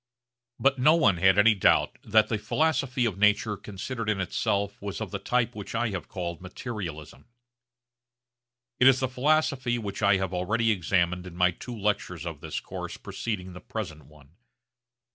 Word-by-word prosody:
But 135 -1 +2
no 150 +6 +6
one 105 - +3
had 95 +2 +4
any 110 +2 +6
doubt 100 - +2
that 110 0 +4
the 110 - -1
philosophy 135 -2 0
of 100 -4 -2
nature 105 +1 +3
considered 105 +4 -5
in 105 -2 0
itself 100 +2 -1
was 100 -1 -5
of 110 -4 -5
the 100 - -3
type 120 +3 0
which 105 +1 -7
I 115 0 +1
have 95 -4 -5
called 85 -2 -5
materialism. 90 - -7 1.5
It 125 - +6
is 130 -1 +6
the 130 - 0
philosophy 130 -2 +1
which 100 -3 -5
I 100 -1 +4
have 95 -1 -3
already 110 +6 +1
examined 90 -1 0
in 90 - -10
my 90 0 +4
two 120 +7 -8
lectures 105 0 -2
of - - -6
this - - -4
course - - -7
preceding 95 -5 -5
the 90 - -10
present 80 -10 -6
one. 75 +2 -20
105 Hz, 170 wpm, -27 LUFS, 90-120 Hz, 1.5 s, no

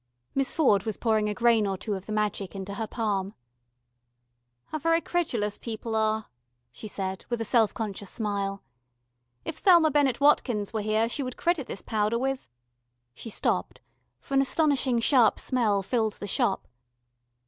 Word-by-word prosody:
Miss 275 -1 +1
Ford 255 - +3
was 215 +1 -4
pouring 215 -2 +1
a - - -1
grain 235 -3 +3
or 195 -1 -2
two 210 +2 -3
of 190 -1 -6
the - - -5
magic 210 -2 -2
into 195 +1 -5
her 220 +2 -3
palm. 205 -3 -2 1.3
"How 310 - -3
very 330 +2 +3
credulous 240 -13 -2
people 225 0 -5
are," 220 0 +1 0.5
she 170 - -8
said 190 -2 -4
with 240 -1 -1
a 225 - -2
self 225 -1 +3
conscious 205 -3 -4
smile. 200 -3 -2 0.8
"If 315 - -4
Thelma 340 -5 +6
Bennett 275 -4 +2
Watkins 245 -8 +2
were 220 - -1
here 215 +2 +1
she 240 - -2
would 255 -2 -5
credit 340 -6 0
this - - -6
powder 215 +1 0
with 265 - -2 0.3
" 120 0 -51
She 225 - -9
stopped, - - -1 0.4
for - - -9
an 270 - +5
astonishing 275 -3 +2
sharp 235 -1 +4
smell 215 -6 +1
filled 220 0 0
the - - -8
Shop. 205 0 0
220 Hz, 170 wpm, -27 LUFS, 205-260 Hz, 1.3 s, Thelma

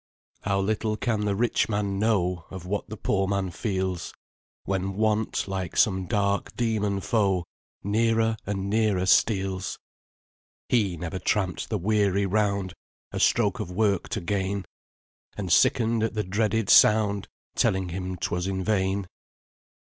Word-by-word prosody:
"How 100 -1 0
little 105 +2 -1
can 110 -1 -1
the 100 -1 0
rich 120 +2 +1
man 100 -2 -1
know 90 -6 +1
Of 95 -2 -8
what 105 +3 -3
the 110 - -6
poor 95 0 0
man 100 -2 -1
feels, 95 -3 -3 0.5
When 95 0 -2
Want, 110 0 0
like 95 -2 -4
some 95 -3 +2
dark 100 0 0
dæmon 105 -4 -1
foe, 100 -6 +1 0.4
Nearer 115 +2 +2
and 100 -1 -2
nearer 105 -3 +1
steals! 95 -1 +1 0.9
He 100 -8 +1
never 85 +3 -4
tramp'd 95 -1 -1
the 110 - 0
weary 100 0 +1
round, 100 -2 0 0.4
A - - -4
stroke - - +2
of - - -4
work 100 0 0
to 105 - -3
gain, 95 +2 -2 0.7
And 95 -4 -3
sicken'd 115 +4 +3
at 110 0 -1
the 105 - 0
dreaded 105 +2 0
sound 105 -2 +5 0.3
Telling 95 -1 +1
him 90 +1 -4
'twas 90 +2 -2
in 95 -1 -2
vain. 95 -1 0
100 Hz, 140 wpm, -26 LUFS, 95-110 Hz, 0.9 s, sound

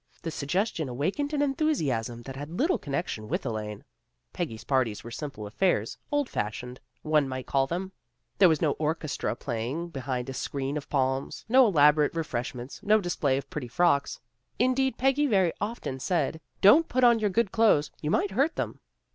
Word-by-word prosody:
The 165 - -3
suggestion 160 - -1
awakened 185 - -1
an 290 -1 +1
enthusiasm 145 - 0
that 135 +2 -8
had 145 +2 -6
little 335 +7 +2
connection 140 -7 -3
with - - -2
Elaine. 105 -3 -4 0.5
Peggy's 125 -10 -4
parties 130 -6 0
were 120 - -8
simple 125 -4 -6
affairs, 110 - 0 0.2
old 290 -2 +1
fashioned, 125 - -4 0.2
one 150 -3 +2
might 130 -1 -5
call 135 -1 +1
them. 185 +5 -3 0.5
There 185 - +8
was 160 -1 +1
no 150 - +3
orchestra 155 -1 -1
play 120 -4 -4
68 - - -3
A - - -2
HALLOWE'EN 170 +5 -4
PARTY - - -28
69 130 -1 -3
ing 125 - -3
behind 125 - -10
a - - -4
screen 140 +2 -3
of 145 - -7
palms, 135 -1 -1
no 255 +2 +6
elaborate 150 -4 +4
re 165 - 0
freshments, 125 -1 -5
no 215 +1 +4
display 155 -8 0
of 140 0 -6
pretty 140 -5 -4
frocks. 140 +2 +1 0.4
In 255 +2 +3
deed 265 0 0
Peggy 270 +3 +2
very 190 -8 +3
often 205 - -4
said, 160 +1 -1
" - - -43
Don't 285 +12 +7
put 255 0 +1
on 235 -2 +6
your 210 -1 +1
good 210 0 +1
clothes; 220 -10 +3
you 150 - -2
might 195 +4 +1
hurt 275 +11 +1
them." - - -3
150 Hz, 200 wpm, -27 LUFS, 130-205 Hz, 0.5 s, There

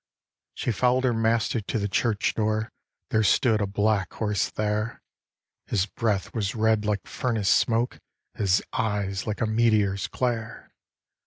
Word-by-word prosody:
She - - -1
follow'd 125 +3 +2
her 125 -2 +2
Master 115 0 +1
to 105 - -3
the 100 -1 -1
church 105 +2 0
door, 110 0 0 0.4
There 110 - +3
stood 110 +1 +3
a 100 - 0
black 100 0 0
horse 105 -3 -1
there; 105 +1 -2 0.7
His 95 - +1
breath 105 -1 -2
was 100 -3 -2
red 110 -1 +2
like 105 -2 -1
furnace 115 -6 -1
smoke, 115 +1 +2 0.3
His 95 -2 +1
eyes 100 -4 -1
like 105 - -3
a - - +3
meteor's 110 -3 +2
glare. 115 -3 -3
110 Hz, 145 wpm, -26 LUFS, 100-115 Hz, 0.7 s, There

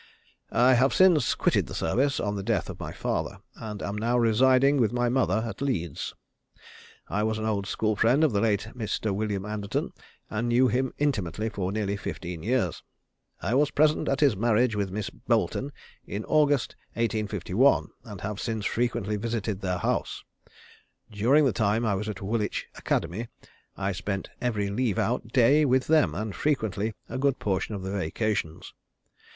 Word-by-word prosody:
I 125 +3 +6
have 130 +2 +3
since 185 -5 +5
quitted - - +1
the - - -7
service, 140 +2 +1
on 105 -2 -1
the 100 - -3
death - - -1
of - - -11
my - - -5
father, - - -3 0.2
and 105 -2 -7
am 100 - -3
now 115 +3 +1
residing 130 +4 +4
with 115 -5 +2
my 120 0 +1
mother 120 -3 +1
at 110 +1 -7
Leeds. 85 - -2 0.9
I 105 - -1
was 110 0 0
an 110 - -3
old 100 -3 -1
school 110 +1 0
friend 125 +9 +3
of 155 - +4
the 100 -2 +1
late 110 -1 +1
Mr. 110 -2 -2
William 100 -1 -2
Anderton, 105 -1 -3 0.4
and 110 +2 -2
knew 125 +2 +4
him 130 +1 0
intimately 110 - -1
for 95 -3 -3
nearly 100 -1 -1
fifteen 85 -4 -6
years. 110 -3 0 0.6
I 100 - 0
was 145 +2 +3
present 155 +1 +2
at 135 - 0
his 140 -7 +4
marriage 115 +2 +2
with 100 -2 -1
Miss 100 +2 -4
Boleton, 140 +2 -1 0.3
in 105 +2 -5
August, 145 -4 +2 0.2
1851, 110 +2 +1
and 105 -6 -9
have 105 +1 -4
since 110 -3 -3
frequently 115 -3 -1
visited 110 -2 -2
at - - -16
their 90 -1 -1
house. 90 - -2 0.9
During 125 +9 +4
the 130 - +2
time 110 +2 +1
I 105 - +2
was 105 +2 -2
at 105 - -6
Woolwich 105 +1 -1
Academy, 110 +7 -2 0.5
I 100 0 -1
spent 100 +1 -4
every 105 -5 -1
leave 115 -2 0
out 120 0 0
day 130 +5 +4
with 130 -2 +2
them, 155 -1 +3
and 105 +1 -3
frequently 110 -4 -1
a - - -5
good 140 -1 +2
portion 100 +1 -1
of 95 - -6
the 95 - -4
vacations. 95 -2 -2
110 Hz, 175 wpm, -27 LUFS, 100-125 Hz, 0.9 s, I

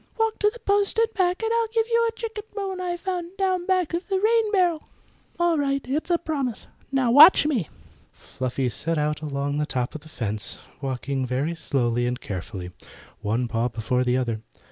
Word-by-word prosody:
"Walk 445 -1 0
to 420 - +4
the 440 - -11
post 405 -1 +1
and 455 0 +2
back 370 +1 +1
and 450 - 0
I'll 465 -1 +2
give 450 0 +1
you 465 0 +2
a 455 - -9
chicken 445 -2 -5
bone 385 -2 -3
I 350 -1 -2
found 355 0 -4
down 370 -2 0
back 370 -4 +1
of 345 +2 -2
the 385 -2 +1
rain 440 +1 +3
barrel." 355 -6 +1 0.5
"All 345 -2 +3
right; 275 -1 0
it's 295 +7 -2
a 345 - +4
promise. 285 -8 -3 0.3
Now 260 -3 +2
watch 300 +6 +9
me." 255 - 0 0.4
Fluffy 130 0 -3
set 165 +7 -2
out 150 0 0
along 145 -1 -2
the 150 - 0
top 125 -4 -2
of 155 - -7
the 155 - -15
fence, 110 -7 -4 0.2
walking 135 0 -2
very 135 +6 -1
slowly 120 -7 0
and 125 +1 -2
carefully, 90 -1 -6 0.5
one 115 +4 0
paw 115 +1 0
before 120 +2 -1
the 125 0 +2
other. 115 -4 -1
275 Hz, 195 wpm, -25 LUFS, -, 0.5 s, watch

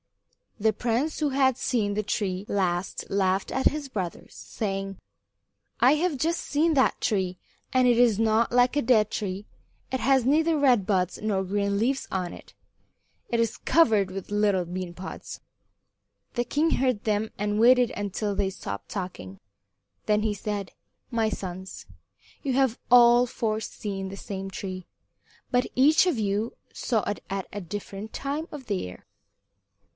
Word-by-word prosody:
The 220 +1 +3
prince 245 +8 -1
who 300 -2 +1
had 265 -2 +2
seen 215 -7 0
the 215 +1 -1
tree 195 -1 -2
last 180 -2 -1
laughed 190 -1 +1
at 265 - +2
his 300 -1 -1
brothers, 185 -8 -5
saying: 195 -2 -4 0.8
"I 255 +5 +6
have 320 -1 0
just 330 +5 0
seen 315 +3 +1
that 265 -3 +3
tree, 190 -4 0 0.4
and 255 -1 +4
it 240 -1 +4
is 235 -4 +4
not 225 +1 +2
like 245 +2 +4
a 290 - +3
dead 220 -3 +4
tree. 195 0 -3 0.5
It 260 - -1
has 265 -1 +3
neither 315 +4 +3
red 250 -8 +4
buds 185 -3 0
nor 205 -3 0
green 200 +1 0
leaves 265 +5 0
on 180 -2 -2
it. - - -13 0.8
It 235 - 0
is 230 -1 0
covered 220 - +3
with 195 0 -6
little 205 -3 +2
bean 180 0 -5
pods." 185 +2 -8 0.9
The 240 -1 0
king 305 +6 +1
heard 255 -7 +1
them 215 0 0
and 210 +1 0
waited 245 +1 +5
until 205 0 -3
they 195 -1 0
stopped 100 - -7
talking. 180 - -6 0.7
Then 210 0 +3
he 215 -1 0
said: 205 -1 -4 0.4
"My 225 -3 +1
sons, 190 -2 -6 0.6
you 270 - 0
have 260 -3 +2
all 240 0 +7
four 220 -2 -1
seen 195 -3 -5
the 195 - -8
same 195 -1 -5
tree, 185 -2 -6 0.7
but 250 0 +3
each 300 +7 +5
of 335 -8 +1
you 210 +2 -1 0.2
saw 225 -4 0
it 205 - -4
at 195 -1 -3
a 205 - -4
different 205 +3 -7
time 290 +4 -3
of 290 -4 -8
the 210 -4 -1
year." 90 - -7
215 Hz, 160 wpm, -26 LUFS, 195-250 Hz, 0.9 s, all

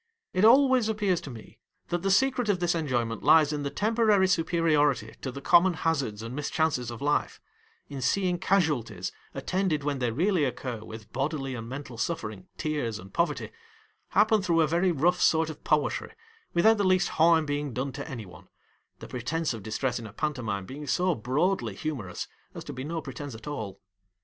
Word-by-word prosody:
It 185 - +1
always 255 0 +6
appears 205 -5 +1
to - - -8
me 115 -4 -12 0.3
that 175 0 -1
the 195 - 0
secret 250 +2 +2
of 195 -3 +2
this 175 -1 +1
enjoyment 120 -8 -1
lies 155 -2 +5
in 150 - -2
the 140 - -2
temporary 215 0 +3
superiority 160 - +2
to 130 - -4
the 140 - -8
common 175 +4 +5
hazards 140 -11 -1
and 115 +3 -6
mischances 145 -4 0
of 120 +2 -7
life; 145 +1 0 0.5
in 140 -2 -6
seeing 180 +5 +1
casualties, 145 - 0 0.2
attended 160 +1 -1
when 145 -2 -1
they 125 -2 +1
really 170 - +1
occur 125 -3 -3
with 110 -1 -11
bodily 135 0 -2
and 115 -2 -6
mental 130 -3 -7
suffering, 110 - -3
tears, 145 -9 -2
and 95 -1 -12
poverty, 170 - -1 0.6
happen 215 0 +3
through 170 -3 +2
a 155 - +3
very 175 +4 +2
rough 175 +4 +2
sort 160 0 +3
of 155 - -13
poetry 150 - 0 0.4
without 220 +6 +5
the - - +2
least 185 -1 +3
harm 160 0 +4
being 145 -1 -2
done 130 +3 -3
to 145 +2 -7
any 120 -5 -6
one 90 -4 -14 0.3
— - - -43
the - - -8
pretence 150 +5 -2
of 115 - -7
distress 120 +4 -2
in 115 - -7
a 100 - -12
pantomime 115 -10 -2
being 145 +7 -8
so 180 +7 +2
broadly 130 - 0
humorous 115 - -4 0.3
as - - -6
to - - -7
be 130 - -6
no 160 +2 -4
pretence 135 0 -7
at 110 - -11
all. 110 -10 -5
150 Hz, 190 wpm, -28 LUFS, 125-175 Hz, 0.6 s, always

